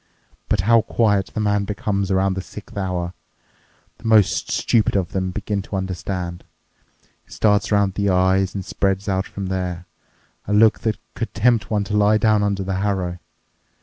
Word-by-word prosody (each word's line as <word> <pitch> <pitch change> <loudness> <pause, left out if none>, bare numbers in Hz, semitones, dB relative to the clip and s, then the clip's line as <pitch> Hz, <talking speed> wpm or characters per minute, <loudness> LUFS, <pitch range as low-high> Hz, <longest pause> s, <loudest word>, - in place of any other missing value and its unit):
But 105 - +2
how 115 +3 +5
quiet 105 -4 +1
the - - -4
man 105 -1 +1
becomes 100 -1 -2
around 95 0 +2
the 95 - -3
sixth 105 +3 -11
hour! 90 -3 -2 0.9
The - - -16
most 110 -3 +3
stupid 110 -3 +1
of 95 -4 0
them 95 -1 -1
begin 100 +1 -3
to 100 - -7
understand. 90 -1 -4 0.8
It - - -24
starts 105 -1 +2
around 100 -2 +2
the 100 +1 0
eyes 95 +1 +2
and 95 -2 -4
spreads 95 0 -1
out 95 0 0
from 100 - -6
there. 90 -2 -3 0.6
A 105 - -1
look 110 +1 +5
that 110 -2 -1 0.2
could 115 - -5
tempt 115 0 +2
one 105 -2 +1
to 105 +1 -3
lie 105 +1 +4
down 110 -1 +3
under 100 -1 0
the 95 0 -2
harrow. 95 -3 -1
100 Hz, 175 wpm, -21 LUFS, 95-105 Hz, 0.9 s, how